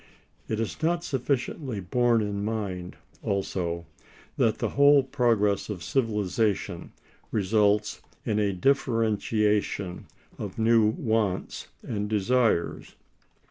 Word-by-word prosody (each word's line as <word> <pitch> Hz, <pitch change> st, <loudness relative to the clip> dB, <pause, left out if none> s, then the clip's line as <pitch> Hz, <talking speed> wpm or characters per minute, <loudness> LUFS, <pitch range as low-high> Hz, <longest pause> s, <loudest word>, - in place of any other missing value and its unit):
It 110 Hz, -, -2 dB
is 115 Hz, +7 st, -3 dB
not 170 Hz, +2 st, +1 dB
sufficiently 135 Hz, -3 st, -2 dB
borne 120 Hz, +5 st, +2 dB
in 100 Hz, -1 st, -3 dB
mind, 100 Hz, -5 st, -3 dB, 0.3 s
also, 90 Hz, -4 st, -2 dB, 0.5 s
that -, -, +2 dB
the -, -, -1 dB
whole 140 Hz, 0 st, +5 dB
progress 115 Hz, -7 st, +1 dB
of 95 Hz, -6 st, -5 dB
civilization 105 Hz, -, -1 dB, 0.4 s
results 105 Hz, 0 st, +2 dB, 0.2 s
in 105 Hz, -1 st, 0 dB
a 105 Hz, -1 st, +2 dB
differentiation 105 Hz, -4 st, 0 dB, 0.3 s
of 100 Hz, -3 st, -6 dB
new 115 Hz, -1 st, +4 dB
wants 110 Hz, -3 st, -1 dB, 0.2 s
and 105 Hz, -2 st, -3 dB
desires. 110 Hz, -3 st, +1 dB
105 Hz, 100 wpm, -27 LUFS, 100-120 Hz, 0.5 s, whole